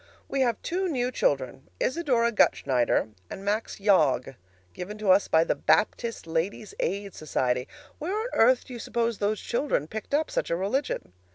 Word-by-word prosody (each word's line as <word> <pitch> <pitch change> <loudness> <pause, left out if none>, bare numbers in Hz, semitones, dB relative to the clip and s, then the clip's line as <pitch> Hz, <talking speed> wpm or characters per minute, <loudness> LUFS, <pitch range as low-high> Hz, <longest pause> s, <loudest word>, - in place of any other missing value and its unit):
We 275 - -1
have 240 -4 +1
two 370 +2 -1
new 250 -6 -1
children, 135 - -1
Isador 255 -6 +1
Gutschneider 125 - +2 0.2
and 195 - -8
Max 210 +2 -1
Yog, 155 - +3 0.4
given 205 +4 -6
to 210 -3 +2
us 195 +2 +4
by 160 0 +4
the - - +1
Baptist 230 0 +1
Ladies' 165 +6 -2
Aid 200 0 -2
Society. 125 -4 -1 0.3
Where 370 +8 -2
on 450 - -2
earth 245 +2 +4
do 255 - -10
you 240 - -6
suppose 235 -1 -1
those 210 +1 0
children 235 - -1
picked 220 - -4
up 310 +1 0
such - - -1
a 170 - +1
religion? 200 - -2
210 Hz, 170 wpm, -27 LUFS, 165-250 Hz, 0.4 s, us